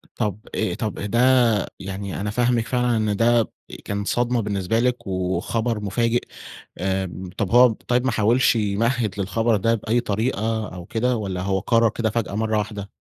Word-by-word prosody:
طب 105 -3 -2 0.2
أ 95 -5 0
طب 105 +2 -3
ده 105 +3 -1 0.6
يعني 95 0 -5
أنا 105 - -2
فاهمِك 120 0 +1
فعلًا، 125 -2 +1
إن 110 -2 0
ده 115 0 +3 0.3
كان 100 0 -2
صدمة 120 +2 0
بالنسبة 100 +1 -1
لِك، 125 -3 0
وخبر 95 +5 -1
مفاجئ، 115 +4 0 0.6
آمم 95 -1 -2
طب 100 -5 -1
هو 125 +1 +8
طيّب 120 +2 -1
ما 130 - +2
حاولش 115 +3 +3
يمهد 110 0 0
للخبر 110 +4 +1
ده 115 +4 +2
بأي 115 +2 0
طريقة 110 -1 -1
أو 90 -1 -8
كده، 120 +5 0
والّا 95 -4 -3
هو 95 +1 0
قرر 115 +2 +3
كده 110 0 -1
فجأة 110 -2 -2
مرّة 110 0 0
واحدة؟ 105 -1 -4
110 Hz, 165 wpm, -23 LUFS, 100-120 Hz, 0.6 s, هو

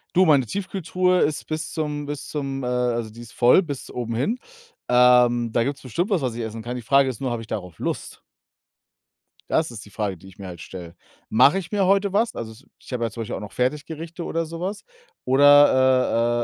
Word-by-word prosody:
Du, 185 - +6
meine 140 -5 +4
Tiefkühltruhe 185 - 0
ist 150 -1 -1
bis 155 +1 -4
zum 150 -2 -3
bis 145 -1 -6
zum, 135 -3 -4
äh - - -2
also, 120 -2 -1
die 115 +2 -14
ist 120 0 -11
voll 125 +9 +5
bis 145 -6 -6
oben 115 -2 -4
hin. 215 - -1 0.5
Ähm, 125 -1 +4
da 115 0 +1
gibt's 140 +1 -3
bestimmt 170 - -2
was, 185 -7 +1
was 125 -3 -2
ich 120 - -4
essen 110 0 -5
kann. 120 +2 -5
Die - - -6
Frage 135 +3 +3
ist 120 - -6
nur, 130 -3 -2
habe 115 -1 -3
ich 110 - -11
darauf 90 -5 -5
Lust? - - -4 1.3
Das 155 - +1
ist 115 -1 -9
die - - -14
Frage, 100 -3 -3
die 95 - -16
ich 95 - -16
mir 95 - -7
halt 85 -3 -9
stelle. 85 -3 -9 0.3
Mache 135 - +5
ich 170 0 -9
mir 200 -2 +1
heute 195 0 +2
was? 230 +3 +1
Also, 110 +3 -8
ich - - -15
habe 120 -1 -1
ja 115 - -1
zum 115 - -6
Beispiel 115 - -4
auch - - -5
noch 105 -2 -8
Fertiggerichte 155 +6 -3
oder 165 0 -2
so 165 +1 -8
was. 195 +3 -4 0.4
Oder, 130 -4 +4
130 Hz, 220 wpm, -23 LUFS, 115-160 Hz, 1.3 s, Du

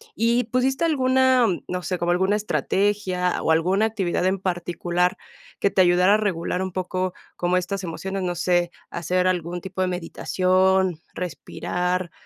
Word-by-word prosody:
¿y 235 +2 +2
pusiste 260 +6 +1
alguna, 260 -4 +3
mm, 180 -4 -2
no 180 0 -3
sé, 185 +1 -2
como 175 0 0
alguna 190 +3 +2
estrategia 200 -3 0
o - - -1
alguna 185 +6 +3
actividad 195 -6 -1
en 190 +1 +1
particular 175 -1 -1 0.4
que 200 - +2
te 190 - +3
ayudara 180 +2 +5
a - - +5
regular 185 -4 -1
un 190 0 -3
poco 185 0 -2 0.2
como 175 +1 +1
estas 195 +2 -3
emociones, 190 +3 -4
no 180 -1 -2
sé, 175 0 +1 0.2
hacer 180 +2 0
algún 175 -1 -1
tipo 185 +1 -5
de 185 - +2
meditación, 185 0 +1 0.2
respirar, 180 0 -3
185 Hz, 155 wpm, -23 LUFS, 175-200 Hz, 0.4 s, ayudara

